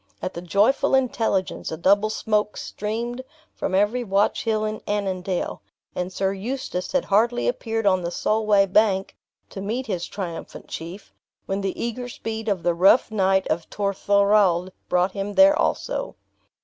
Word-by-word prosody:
At 185 - -4
the 170 - -6
joyful 205 - +2
intelligence 225 -7 0
a 160 - -4
double 200 +5 +3
smoke 210 -1 -1
streamed 235 +4 -4 0.3
from 185 - -2
every 210 +6 +2
watch 200 +1 +1
hill 215 -1 +1
in 215 0 -4
Annandale; 190 -3 -2 0.3
and 180 +1 -3
Sir 195 +1 -1
Eustace 200 -3 -4
had 275 - +1
hardly 235 +4 +2
appeared 225 - -2
on 185 -2 +3
the 170 - -2
Solway 210 +2 +2
bank, 195 0 +2 0.4
to 195 - -6
meet 230 +6 -3
his 180 -6 -3
triumphant 175 -5 -7
chief, 175 +5 -8 0.3
when 195 +1 -2
the 195 -1 -3
eager 245 +1 -3
speed 225 -1 -5
of 190 -4 -1
the 175 - +2
rough 195 +7 +4
knight 190 -2 +2
of 165 +1 -2
Torthorald 200 -2 +2 0.2
brought 180 +1 +2
him 200 +1 -4
there 290 +1 +7
also. - - -1
200 Hz, 155 wpm, -23 LUFS, 190-220 Hz, 0.4 s, there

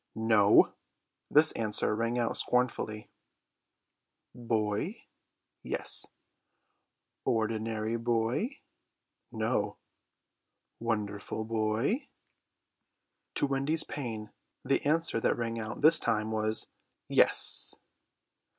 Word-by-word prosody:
"No!" 110 -2 +5 0.6
This 155 +2 +5
answer 105 -1 0
rang 115 +2 -1
out 120 -1 0
scornfully. 120 -3 -1 1.2
"Boy?" 110 -4 -2 0.6
"Yes." - - -2 1.2
"Ordinary 110 0 -1
boy?" 120 - -1 0.7
"No!" - - -1 1.0
"Wonderful 105 -1 -3
boy?" 115 - 0 1.3
To - - +1
Wendy's 140 +3 +2
pain 115 -7 -6 0.3
the 135 - +1
answer 165 -4 +1
that - - +1
rang 115 -1 -3
out 110 0 -6
this 155 +2 +6
time 110 0 0
was 110 0 0 0.4
"Yes." - - +3
115 Hz, 80 wpm, -30 LUFS, 110-125 Hz, 1.3 s, this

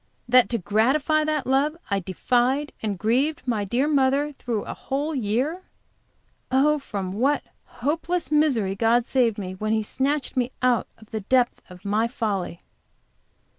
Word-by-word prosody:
That 250 0 +5
to 235 - 0
gratify 270 - +2
that 305 -3 -1
love 280 +4 +1
I 200 - +2
defied 250 +9 0
and 210 -3 -2
grieved 260 - +1
my 225 -5 0
dear 240 +8 0
mother 280 0 +2
through 235 -6 -3
a - - -5
whole 290 +4 -3
year! 260 - -1 0.9
Oh, 295 +3 +3
from 195 -8 -5
what 270 +8 +1 0.2
hopeless 325 +7 -2
misery 270 -11 +2
God 230 +3 +3
saved 240 -5 +2
me, 185 -3 -5
when 215 +3 -2
He 220 -1 +1
snatched 275 +7 -1
me 255 0 0
out 250 -2 +3
of 220 - -18
the 220 -1 -3
depth 245 +4 +1
of 180 +2 -14
my 215 +3 +1
folly! 205 -8 -3
250 Hz, 155 wpm, -24 LUFS, 215-285 Hz, 0.9 s, That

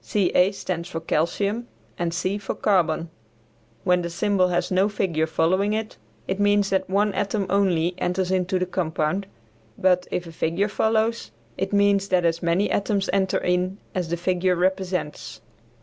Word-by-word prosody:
Ca 185 -2 +2
stands 175 -3 -4
for 165 - -4
calcium 200 +8 -1 0.3
and 170 -1 -2
C 185 +4 -1
for 195 - -4
carbon. 170 -4 +1 0.7
When 180 0 +3
the 170 - -3
symbol 190 +1 +1
has 175 0 -1
no 190 +3 +3
figure 170 -6 0
following 185 +6 +1
it, 220 0 -3 0.3
it 190 +1 -2
means 205 -1 +3
that 190 -1 0
one 205 +1 +2
atom 200 +1 -1
only 180 -4 +2
enters 180 +1 -1
into 185 0 +1
the 185 - 0
compound; 175 +1 -1 0.5
but 180 -1 +2
if 175 - -2
a 165 - -9
figure 170 +5 0
follows, 220 - 0 0.3
it 190 +1 -3
means 200 -1 +3
that 180 -3 +2
as 165 0 +1
many 170 +4 +1
atoms 200 -1 0
enter 190 -1 +2
in 180 +2 0 0.2
as 180 -4 -2
the 170 - -1
figure 180 +1 +1
represents. 185 -3 -2
185 Hz, 165 wpm, -24 LUFS, 175-200 Hz, 0.7 s, When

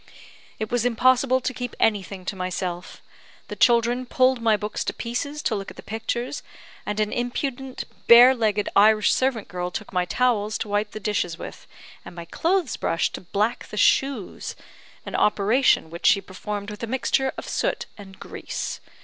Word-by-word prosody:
"It 215 -1 -4
was 245 -2 +1
impossible 255 +2 +3
to 255 - -2
keep 245 -1 -5
anything 195 -3 0
to 195 - -3
myself. 185 -1 -4 0.5
The - - -5
children 240 +1 +3
pulled 255 -1 +2
my 220 -2 +3
books 210 0 -3
to - - -2
pieces 285 +6 -4
to - - 0
look 195 -2 -4
at - - -13
the - - -10
pictures; 235 +4 -3 0.5
and 210 0 -2
an 215 -1 0
impudent, 255 +2 -3 0.2
bare 245 +2 +9
legged 215 -4 0
Irish 215 +1 +5
servant 255 -5 0
girl 180 -1 -4
took 205 +3 -7
my 180 -1 +1
towels 215 -1 +1
to - - -4
wipe 205 +1 0
the 215 - -7
dishes 195 -5 -1
with, - - -9 0.4
and - - -11
my 170 -1 -7
clothes 335 - 0
brush 165 - 0
to - - -7
black 210 +6 -1
the 210 - -8
shoes 270 -3 +1 0.5
an - - -7
operation 210 -3 +3
which 170 - -1
she - - +6
performed 200 +2 -6
with 210 - -9
a 230 - -3
mixture 265 +2 0
of - - -7
soot - - -1
and 195 -2 -13
grease. 200 - -5
220 Hz, 175 wpm, -24 LUFS, 200-250 Hz, 0.5 s, bare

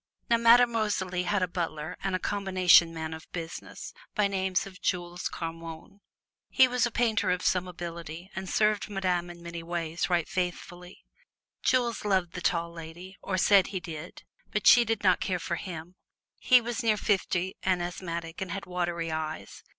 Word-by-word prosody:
Now, 235 - +6
Madame 235 +1 +6
Rosalie 190 -5 -1
had 195 +1 +1
a - - +1
butler 165 -2 -4
and 190 -1 0
combination 185 -4 +4
man 160 -1 -5
of 160 0 -11
business, 165 -1 -7 0.2
by 210 -2 +3
name 190 -1 -2
of 195 -1 -12
Jules 175 -1 -2
Carmonne. 165 +3 -7 0.5
He 260 - +6
was 250 -1 +1
a - - -4
painter 220 -4 +1
of 180 0 0
some 185 0 +1
ability 170 -1 -7
and 190 -1 -5
served 210 -1 +1
Madame 180 -3 -1
in 170 0 -11
many 170 0 -6
ways 165 0 -3
right 175 -3 +1
faithfully. 180 0 -5 0.6
Jules 245 -3 +1
loved 190 -4 +1
the 180 - -5
Tall 170 -1 0
Lady, 170 +3 -9
or 185 - -2
said 195 0 +5
he 190 -1 -4
did, 165 -1 -8 0.3
but 210 - -2
she 240 - +8
did 225 -2 -2
not 185 -2 +4
care 185 -2 0
for 170 0 -3
him. 175 -2 -7 0.5
He 250 -2 +6
was 235 +1 -3
near 220 -2 +2
fifty 190 -2 0
and 185 -1 +1
asthmatic 170 -1 -5
and 190 - -3
had 195 +2 -4
watery 175 -2 -2
eyes. 155 0 -5
180 Hz, 175 wpm, -28 LUFS, 170-200 Hz, 0.6 s, she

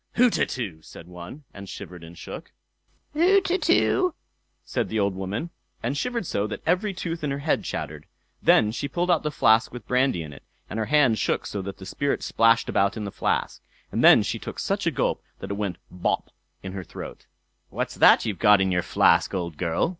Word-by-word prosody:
"Hutetu!" 125 - +1
said 80 - -12
one, 90 - -10
and 100 -1 -10
shivered 90 -3 -9
and 85 +1 -12
shook. 85 - -9 0.6
"Hutetu!" 360 0 +3 0.5
said - - -2
the 110 - -1
old 100 -1 +1
woman, 95 - -4 0.3
and 125 +5 -1
shivered 235 +6 -2
so, 105 -8 -1
that 105 - -7
every 185 +5 +1
tooth 170 -3 -5
in 150 - 0
her 140 - -2
head 160 - +1
chattered. - - -5 0.3
Then 105 - +4
she 140 +5 -3
pulled 175 +5 0
out 170 - +3
the 150 - -1
flask 110 -6 +3
with 120 -3 -10
brandy 125 -9 +1
in 75 -2 -9
it, 70 - -13 0.3
and 110 - -5
her 110 - -1
hand 135 -8 +4
shook - - 0
so 100 - -4
that 95 0 -7
the 95 - -10
spirit 140 +8 -2
splashed 115 0 +3
about 100 +2 +1
in 110 - -4
the 100 - -5
flask, - - -1 0.3
and - - -1
then - - +8
she - - -3
took - - -7
such - - -1
a - - +3
gulp, - - -1 0.2
that - - -7
it - - 0
went 100 -4 -3
"bop" 90 - -2 0.3
in 95 - -5
her 95 -1 -5
throat. - - -9 0.4
"What's - - -3
that - - +6
you've 105 -4 -3
got 105 -2 +6
in 95 -1 +1
your 90 -1 +2
flask, - - +3
old 85 -3 -3
girl?" 85 - 0
110 Hz, 205 wpm, -25 LUFS, 95-155 Hz, 0.6 s, then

